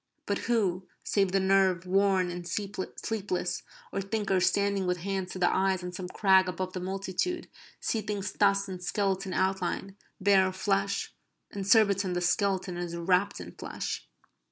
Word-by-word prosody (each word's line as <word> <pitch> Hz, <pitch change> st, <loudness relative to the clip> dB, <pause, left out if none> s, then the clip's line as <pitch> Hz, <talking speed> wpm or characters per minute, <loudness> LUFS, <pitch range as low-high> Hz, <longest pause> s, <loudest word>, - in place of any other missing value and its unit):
But 200 Hz, -, -1 dB
who, 190 Hz, -6 st, +1 dB, 0.2 s
save 195 Hz, -3 st, +1 dB
the 195 Hz, -, +3 dB
nerve 190 Hz, -2 st, +3 dB
worn 190 Hz, -1 st, +2 dB
and 175 Hz, 0 st, -6 dB
sleepless, 200 Hz, 0 st, -3 dB, 0.3 s
or 195 Hz, -, 0 dB
thinkers 195 Hz, -2 st, +1 dB
standing 200 Hz, 0 st, +1 dB
with 180 Hz, 0 st, +1 dB
hands 190 Hz, -1 st, -2 dB
to -, -, -6 dB
the 180 Hz, -1 st, +2 dB
eyes 190 Hz, -1 st, +1 dB
on 180 Hz, -, -4 dB
some 180 Hz, 0 st, -5 dB
crag 190 Hz, -1 st, +4 dB
above 185 Hz, 0 st, -4 dB
the 185 Hz, -, -3 dB
multitude, 195 Hz, -, -2 dB, 0.3 s
see 225 Hz, -, -1 dB
things 205 Hz, -2 st, -3 dB
thus 200 Hz, -1 st, +2 dB
in 185 Hz, -2 st, -6 dB
skeleton 190 Hz, +1 st, -1 dB
outline, 190 Hz, +1 st, -1 dB, 0.2 s
bare 195 Hz, -1 st, +5 dB
of 185 Hz, -, -4 dB
flesh? 195 Hz, 0 st, 0 dB, 0.4 s
In 200 Hz, -, -4 dB
Surbiton 200 Hz, -3 st, +4 dB
the 175 Hz, -, -1 dB
skeleton 185 Hz, 0 st, +1 dB
is 175 Hz, -1 st, -4 dB
wrapped 180 Hz, +3 st, +1 dB
in -, -, -8 dB
flesh. -, -, -5 dB
190 Hz, 160 wpm, -29 LUFS, 185-200 Hz, 0.4 s, bare